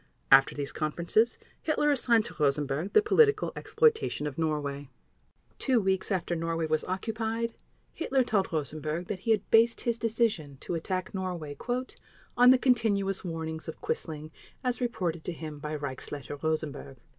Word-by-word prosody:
After 135 0 +7
these 140 -1 -2
conferences 170 +9 +1 0.2
Hitler 295 -1 +2
assigned 235 -5 +3
to - - -7
Rosenberg 145 +5 0
the 425 - +6
political 430 0 +4
exploitation 450 - +1
of 145 -3 -3
Norway. 145 -3 -2 0.7
Two 255 -4 +3
weeks 190 -1 0
after 180 -2 0
Norway 165 0 -1
was 155 0 0
occupied, 225 +4 -2 0.4
Hitler 270 -5 +1
told 210 -5 0
Rosenberg 155 +2 -3
that 195 - -3
he 210 - -6
had 215 -2 +2
based 230 +1 +5
his 235 -1 -1
decision 210 - 0
to - - -4
attack 185 +2 -3
Norway 180 -6 -4 0.8
"on 245 +1 +7
the 260 - +8
continuous 215 -7 +1
warnings 160 -2 -5
of 160 - -6
Quisling 155 -1 -4 0.3
as 250 0 0
reported 175 -9 -2
to 180 - -3
him 155 -2 -7
by 150 +1 -4
Reichsleiter 140 0 -6
Rosenberg." 150 -4 -3
180 Hz, 150 wpm, -29 LUFS, 155-230 Hz, 0.8 s, the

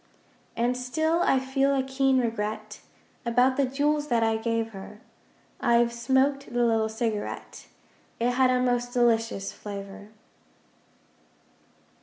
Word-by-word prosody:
And 240 +2 +1
still 315 +7 0
I 270 - +3
feel 270 +1 +1
a 265 - +1
keen 265 0 +1
regret 225 -3 -3 0.4
(About 250 +2 +3
the 275 -1 +1
jewels 295 +3 0
that 235 -4 +2
I 225 0 +2
gave 225 0 -1
her) 200 +1 -10 0.6
I've 235 -1 +3
smoked 265 +3 +1
the 240 0 +1
little 225 -1 +1
cigarette 220 -2 -4 0.5
It 240 +1 +2
had 255 +1 +3
a 255 0 +2
most 245 -1 0
delicious 225 -4 +1
flavour. 200 0 -9
245 Hz, 125 wpm, -26 LUFS, 225-265 Hz, 0.6 s, I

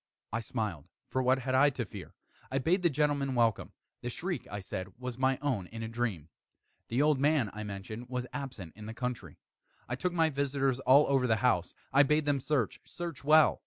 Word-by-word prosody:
I 115 - +1
smiled, 110 - -3 0.3
for 130 - +1
what 130 +1 +4
had 130 0 -2
I 140 +3 +6
to 130 -4 -3
fear? - - -10 0.4
I 135 - 0
bade 170 +8 +2
the 175 - +4
gentlemen 145 -2 +1
welcome. 115 -3 +2 0.3
The - - -3
shriek, - - -3
I 100 - -4
said, 95 0 -5
was 125 -1 -5
my 130 0 +3
own 120 -11 0
in 115 +2 -7
a - - -3
dream. 110 -9 -3 0.6
The 125 +5 +2
old 150 -3 +3
man, 140 -7 +2
I 105 - -6
mentioned, 110 +4 -6
was 125 -1 -2
absent 125 - -6
in 105 0 -9
the 110 - -6
country. 125 -1 -4 0.5
I 120 - -2
took 180 +8 -1
my 165 -2 +2
visitors 135 -2 0
all 135 +2 +6
over 135 -2 +2
the 110 - +4
house. 105 -6 +1 0.2
I 140 - +7
bade 150 +2 +3
them 145 -1 +2
search 135 -4 0
search 170 -4 -6
well. 155 +2 +6
130 Hz, 205 wpm, -31 LUFS, 110-140 Hz, 0.6 s, I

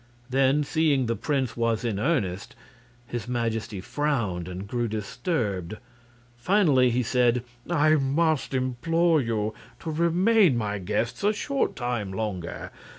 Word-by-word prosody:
Then, 135 +2 +3
seeing 145 -3 +2
the 115 0 0
prince 135 -4 -1
was 115 0 0
in 105 -4 -1
earnest, 105 - -1 0.5
his 120 0 -5
Majesty 115 -4 -2
frowned 110 - -1
and 90 +2 -6
grew 120 +2 -1
disturbed. 105 - -2 0.6
Finally 145 -5 +4
he 125 +1 +1
said: 125 0 +2 0.3
"I 155 -3 +3
must 145 +1 +1
implore 155 +6 +2
you 110 -3 -1 0.3
to 160 - -4
remain 170 - +3
my 105 -2 -2
guests 105 - -2
a 210 +1 +3
short 275 +6 -1
time 120 -6 -2
longer. 95 -4 -4
125 Hz, 130 wpm, -26 LUFS, 110-150 Hz, 0.6 s, Finally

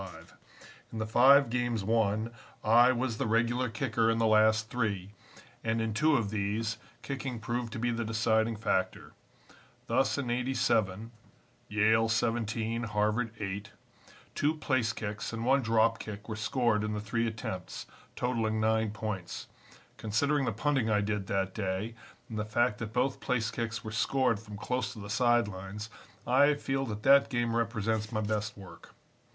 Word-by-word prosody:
In - - -6
the 110 - -1
five 130 +3 +6
games 120 -3 0
won 110 +1 +1 0.3
I 120 +3 +6
was 120 -2 -2
the - - 0
regular 120 +3 +1
kicker 115 -1 0
in 115 - +2
the 115 - +2
last 110 0 +4
three, 100 -6 -2 0.5
and, 115 0 0
in 115 -1 -1
two 155 +7 +3
of 105 -4 -2
these, 110 +2 -2 0.2
kicking 135 -3 -4
proved 115 +2 -3
to - - -4
be 120 +2 0
the 115 0 -2
deciding 110 0 +1
factor. 95 -3 -2 0.7
Thus 130 +5 +1
in 130 -4 -2
'87 115 -4 0 0.6
Yale 110 +2 +3
17, 115 0 0
Harvard 105 +2 0
8 100 +1 -4 0.6
two 150 +2 +1
place 130 -7 0
kicks 105 -2 -5
and 115 0 -3
one 135 +2 +4
drop 115 -1 +2
kick 105 -1 -8
were 110 - -4
scored 110 -1 +1
in 105 0 -2
the 105 - -2
three 115 +3 -1
attempts, 110 -5 -5 0.3
totaling 115 -3 0
nine 110 0 +2
points. 105 -4 -5 0.5
Considering 140 +6 +1
the 115 - 0
punting 130 +1 0
I 105 -1 +3
did 105 -1 -2
that 95 -1 -1
day, 100 +2 -3 0.3
and 110 -2 -5
the - - 0
fact 105 0 0
that 115 -2 -5
both 125 +3 0
place 120 -5 -1
kicks 115 -1 -3
were 110 - -6
scored 125 0 +1
from 105 -2 -10
close 125 +4 -2
to 110 - -10
the 100 0 -7
side 120 0 +3
lines, 100 +3 -7 0.3
I 140 +4 +4
feel 135 -1 -2
that 105 -1 -5
that 140 +1 +6
game 120 -3 0
represents 110 -2 -1
my 110 -2 -1
best 105 0 -2
work. 95 -2 -13
115 Hz, 165 wpm, -30 LUFS, 105-120 Hz, 0.7 s, five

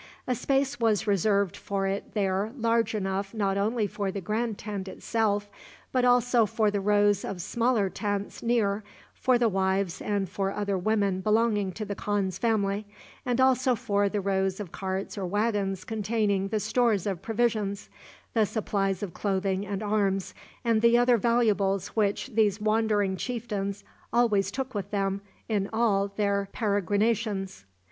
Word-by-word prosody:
A 255 - 0
space 270 0 0
was 225 -3 +2
reserved 200 -1 +2
for 195 -1 -2
it 195 +2 -3
there 200 +1 0
large 230 -2 +1
enough 195 +1 -2
not 200 -3 +1
only 215 +3 +1
for 200 0 -3
the 200 - -4
grand 215 +3 -2
tent 200 -2 -5
itself, 205 +1 -1 0.4
but 255 -1 +1
also 245 -2 +4
for 220 -1 +1
the 205 -1 -1
rows 205 0 +3
of 190 - -5
smaller 230 +2 +1
tents 205 +1 -3
near, 220 -3 +1 0.3
for 255 -1 +2
the 240 -1 +3
wives 190 -2 0
and 200 -2 -1
for 195 +1 -2
other 200 -1 -1
women 200 -1 +1
belonging 210 -1 +2
to 215 +4 -5
the 200 - -3
khan's 195 -2 -2
family, 210 -3 0 0.4
and 245 0 +1
also 260 -1 +4
for 205 -4 +1
the 205 0 -1
rows 190 0 0
of 195 -5 -6
carts 190 +1 -4
or 190 - -2
wagons 205 -1 0
containing 210 -2 0
the 215 +1 -1
stores 220 -2 +1
of 195 -5 -2
provisions, 215 -3 -1 0.5
the 220 -3 +3
supplies 195 -3 -1
of 185 -5 -5
clothing 195 0 -1
and 200 +1 -3
arms, 200 -2 0 0.3
and 225 -2 +3
the 235 +1 +5
other 245 0 +4
valuables 205 -4 +2
which 205 -2 0
these 210 -2 +2
wandering 215 -2 +1
chieftains 205 -3 -3 0.3
always 215 -4 +3
took 260 +4 -4
with 200 -2 -4
them 195 -1 -1 0.3
in 205 -3 0
all 215 -3 +2
their 200 -1 -1
peregrinations. 205 - 0
205 Hz, 155 wpm, -27 LUFS, 195-225 Hz, 0.5 s, the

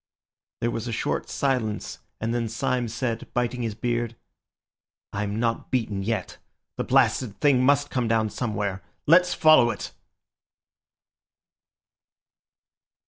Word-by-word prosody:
There 120 - +1
was 115 +1 -4
a - - -3
short - - -2
silence, 125 -6 -1 0.2
and 115 +1 -1
then 115 -2 -1
Syme 120 +2 -1
said, 115 0 -3
biting 120 0 0
his 115 -3 -2
beard— 120 0 -2 1.0
"I'm 105 +1 -2
not 115 -1 -1
beaten 110 -6 -1
yet. 105 -2 -3 0.4
The - - -1
blasted 125 -4 +2
thing 140 -4 +4
must 145 +2 +3
come 125 -3 0
down 110 -1 +1
somewhere. 100 -5 -2 0.2
Let's 175 +3 +5
follow 155 -6 +6
it!" - - -5
120 Hz, 120 wpm, -25 LUFS, 110-125 Hz, 1.0 s, follow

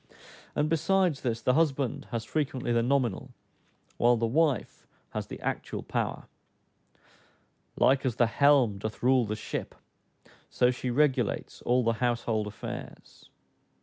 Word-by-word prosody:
And 150 - +1
besides 165 0 +1
this, 115 -3 -2
the 125 - +3
husband 140 -3 0
has 115 -1 -3
frequently 130 -4 -2
the 115 0 +3
nominal, 125 -4 0 0.7
while 120 0 +4
the 115 - 0
wife 140 0 0 0.2
has - - -4
the - - -8
actual - - -3
power: - - -3 1.5
"Like 135 +1 +3
as 130 -5 -1
the 120 - +4
helme 125 -4 +3
doth 110 +3 -6
rule 130 -1 +4
the 105 0 -3
shippe," 105 - -5 0.7
so 125 0 +3
she 125 0 -4
regulates 130 -3 0
all 125 +1 +2
the 115 0 +2
household 115 -2 -1
affairs. 105 - -9
125 Hz, 135 wpm, -28 LUFS, 115-140 Hz, 1.5 s, while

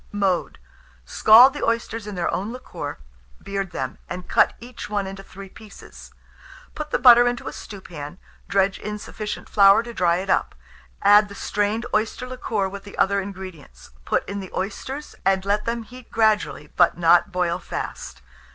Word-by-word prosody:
Mode. 195 -3 -1 0.5
Scald 240 +5 +7
the 290 - -5
oysters 230 -2 -2
in 210 - -6
their 175 -1 -1
own 200 +4 -2
liquor, 255 +1 -7 0.4
beard 195 -1 -4
them, 130 -4 -5
and 180 0 -6
cut - - +3
each 240 -2 -9
one 205 -2 -1
into 195 0 -7
3 195 0 -11
pieces. 210 +1 -14 0.6
Put 305 0 -6
the - - +1
butter 245 -1 +7
into 245 0 -2
a - - -5
stewpan, 175 -6 -9 0.3
dredge 195 -1 +1
in 210 0 -5
sufficient 210 0 -6
flour 200 +2 +6
to 235 0 -8
dry 175 -5 +2
it 185 +2 -3
up; - - 0 0.5
add 205 +1 +6
the 200 - -10
strained 210 +3 -1
oyster 220 +4 -1
liquor 235 -6 -2
with 195 +1 -8
the 200 - -12
other 200 0 +2
ingredients; 185 - -10
put - - -1
in 200 0 -4
the 190 -2 -7
oysters, 260 +9 -5
and 190 0 +1
let 205 +1 0
them 230 0 -2
heat 250 +2 -14
gradually, 215 -9 +1
but - - +4
not 175 +2 +4
boil 180 -2 0
fast. - - -7
200 Hz, 170 wpm, -23 LUFS, 190-225 Hz, 0.6 s, Scald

